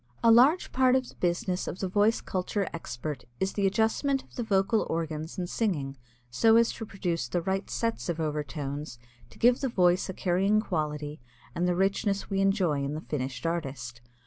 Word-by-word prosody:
A 230 - +7
large 265 +10 +5
part 255 0 +4
of 260 -1 +1
the - - -12
business 180 +1 -1
of - - -4
the 190 - -2
voice 205 +4 +2
culture 190 +2 -2
expert 145 -4 -5
is 190 0 0
the 200 -1 +2
adjustment 225 +7 +1
of - - -25
the - - -2
vocal 215 0 +1
organs 160 -1 -3
in 180 - -2
singing 165 -10 -1 0.4
so 225 - +4
as 230 0 +5
to 225 - -7
produce 175 -9 -2
the 175 - -1
right 190 +3 -2
sets 230 -5 -2
of 170 -1 -2
overtones 150 -3 -3 0.3
to 115 - -17
give 245 +1 +4
the 270 - 0
voice 180 -3 +2
a - - -3
carrying 195 +4 +2
quality 150 -6 -3 0.3
and 175 +5 0
the 180 - +1
richness 195 +2 0
we 195 0 +1
enjoy 185 -8 +2
in 140 +2 -2
the 155 - -4
finished 130 -3 -4
artist. 135 -8 -3
180 Hz, 190 wpm, -28 LUFS, 150-215 Hz, 0.4 s, A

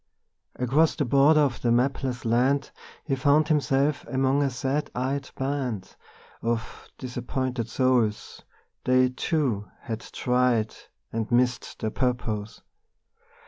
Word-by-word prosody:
Across 140 +6 +2
the 145 - 0
border 140 +5 +5
of 135 -5 0
the 120 - +2
mapless 125 0 0
land 130 +5 +2 0.3
He 140 - -2
found 145 +3 +3
himself 145 -1 +2
among 135 +1 +1
a 140 - +2
sad 135 +3 -2
eyed 135 +2 -2
band 130 -8 -3 0.5
Of 115 0 -3
disappointed 125 -1 -3
souls; 125 -5 0 0.4
they, 130 0 +4
too, 125 -6 -1
had 115 -2 -4
tried 125 -2 0 0.4
And 115 0 -2
missed 125 +1 +1
their 110 - -3
purpose. 115 -5 -2
130 Hz, 115 wpm, -26 LUFS, 120-140 Hz, 0.5 s, border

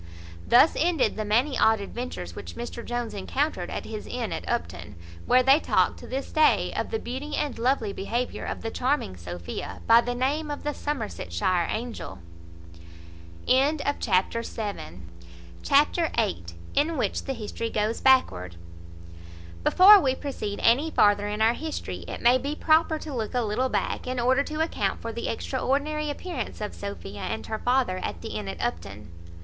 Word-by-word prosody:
Thus 245 +7 +6
ended 325 -8 +2
the 215 - -2
many 245 +7 +1
odd 220 -1 +4
adventures 240 +5 -6
which - - -8
Mr 235 0 -6
Jones 240 -1 -3
encountered 95 -3 -2
at - - -5
his - - -7
inn - - -3
at - - -5
Upton, 85 +3 -3 0.3
where 255 0 +5
they 270 +3 +6
talk, - - +2
to - - -11
this 270 +1 -4
day, 310 0 +3
of - - -2
the 445 - -1
beauty 280 - -5
and 290 -6 -2
lovely 235 -4 +1
behaviour 235 +6 -3
of - - -5
the 225 - -3
charming 255 - -1
Sophia, 85 0 -7
by 230 +1 +7
the 245 0 -3
name 290 +5 -1
of 290 - -5
the 295 - -1
Somersetshire 185 - -1
angel. 225 - -5 1.3
Chapter 255 -6 +2
viii. 200 - -6 1.7
In 310 +3 +1
which - - -1
the 270 - -2
history 230 0 -4
goes 215 +1 -1
backward. 90 - +3 1.1
Before 400 +3 +8
we 265 -6 +1
proceed 260 -8 -5
any 265 +8 +4
farther 205 -7 +3
in 210 +1 -1
our 225 +1 +4
history, 315 +4 -5
it - - -7
may 245 +2 +5
be 285 +4 -3
proper 315 0 +3
to 305 -1 -7
look 225 -1 -3
a 245 - +2
little 235 +4 0
back, - - -2
in 255 0 -2
order 260 +3 +3
to 305 +2 -3
account 210 -11 -1
for 230 - -5
the 235 - -4
extraordinary 285 +5 -1
appearance 290 -4 -5
of 210 -1 -4
Sophia 200 - -7
and 220 - -4
her 220 -1 -4
father 245 -7 +1
at 85 - -5
the - - -5
inn 105 -2 -5
at 95 - -6
Upton. 100 +3 -4
240 Hz, 165 wpm, -26 LUFS, 205-280 Hz, 1.7 s, Before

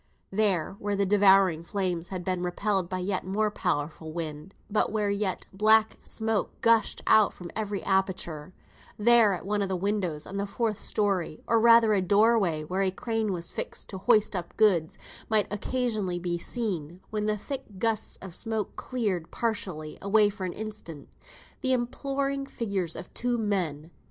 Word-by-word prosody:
There, 195 -3 +1
where 205 0 -1
the 200 0 +1
devouring 195 -4 +5
flames 180 -1 -2
had 185 -1 -5
been 185 -1 -1
repelled 185 +1 -1
by 185 - -2
the 180 - -3
yet 190 0 -1
more 210 +3 0
powerful 160 -4 -2
wind, 155 +1 -6
but 210 0 +1
where 210 -2 0
yet 200 -2 -1
black 215 +2 +4
smoke 220 -2 -1
gushed 230 -1 +3
out 215 -2 +5
from 175 -1 -9
every 205 -3 -3
aperture, 185 -5 -1 0.5
there, 225 -1 +5
at 175 - -9
one 205 +1 0
of 195 - -1
the 190 - 0
windows 180 -5 -1
on 195 - -6
the 200 +1 -1
fourth 220 0 -2
story, 190 -7 -1
or 230 - +3
rather 230 -1 +6
a 195 - +2
doorway 200 -4 +3
where 185 +5 -2
a 195 - +3
crane 220 +2 -2
was 170 -2 -4
fixed - - -4
to 190 - -6
hoist 215 0 +3
up 175 -2 -5
goods, 185 -8 +3 0.3
might 215 -2 +4
occasionally 215 -4 -1
be 175 -1 -2
seen, 180 -7 -3
when 210 -1 -1
the 210 0 +1
thick 260 -3 -7
gusts 225 +1 0
of 190 -3 -8
smoke 220 0 -2
cleared 205 -10 -2
partially 185 -9 -3
away 205 +1 +4
for 200 -2 -5
an 180 - -3
instant, 205 -9 -8 0.5
the 260 0 +2
imploring 275 +3 -2
figures 200 -10 -2
of 180 - -9
two 245 0 -1
men. 175 -8 -2
200 Hz, 170 wpm, -27 LUFS, 180-220 Hz, 0.5 s, rather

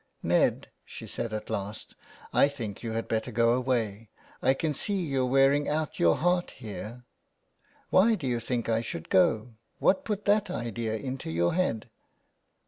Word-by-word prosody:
" - - -42
Ned," - - +2
she - - -9
said 115 - -4
at 110 0 -5
last, 105 +2 -4 0.2
'' - - -21
I - - +7
think 115 -8 -6
you 115 -2 -4
had 115 0 -2
better 110 +2 -1
go 115 +1 +3
away. 115 -4 -1 0.3
I 135 - +3
can 155 +2 -1
see 200 +8 -1
you're 135 -7 0
wearing 135 +2 +3
out 155 -1 -2
your 85 -1 +5
heart 175 +1 +1
here." 115 +3 -8 0.4
'' - - -36
Why 220 +5 +5
do 150 - -6
you 120 -2 0
think 120 0 -2
I 115 0 +1
should 85 -8 -6
go? 110 +5 +3 0.2
What 190 - +2
put 210 -2 -3
that 205 -1 +3
idea 115 - -3
into 130 -2 -5
your 85 +2 +1
head 170 -12 0
120 Hz, 180 wpm, -28 LUFS, 110-145 Hz, 0.4 s, I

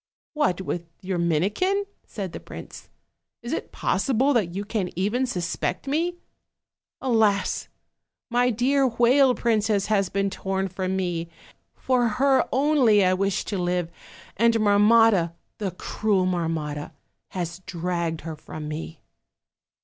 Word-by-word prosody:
"What! 190 - +1
with 175 -2 -4
your 185 -2 -2
Minikin?" 200 - +1 0.2
said 195 -4 -5
the - - -7
prince; - - -10 0.5
"is - - -4
it - - -4
possible 270 +2 +1
that 190 -8 0
you 200 +1 -3
can 205 -4 -2
even 210 +9 0
suspect 180 0 -2
me? 330 +5 0 0.9
Alas! 220 -6 +1 0.6
my 245 0 +2
dear 260 +4 +2
whale 250 +2 +4
princess 215 -3 +1
has 195 -3 +2
been 195 0 0
torn 190 0 -2
from 185 +1 -2
me; 175 -3 -2 0.5
for 250 -2 +1
her 270 0 +4
only 260 -7 +4
I 185 - +3
wish 195 0 0
to 200 -3 -3
live, 175 -1 -1 0.4
and 230 +2 +3
Marmotta, 210 -3 +4 0.3
the 205 -3 -1
cruel 190 +2 0
Marrnotta, 160 -4 -2 0.3
has 175 -1 -5
dragged 170 -2 -2
her 160 -1 -6
from 155 0 -8
me." 155 +1 -7
195 Hz, 130 wpm, -25 LUFS, 175-240 Hz, 0.9 s, whale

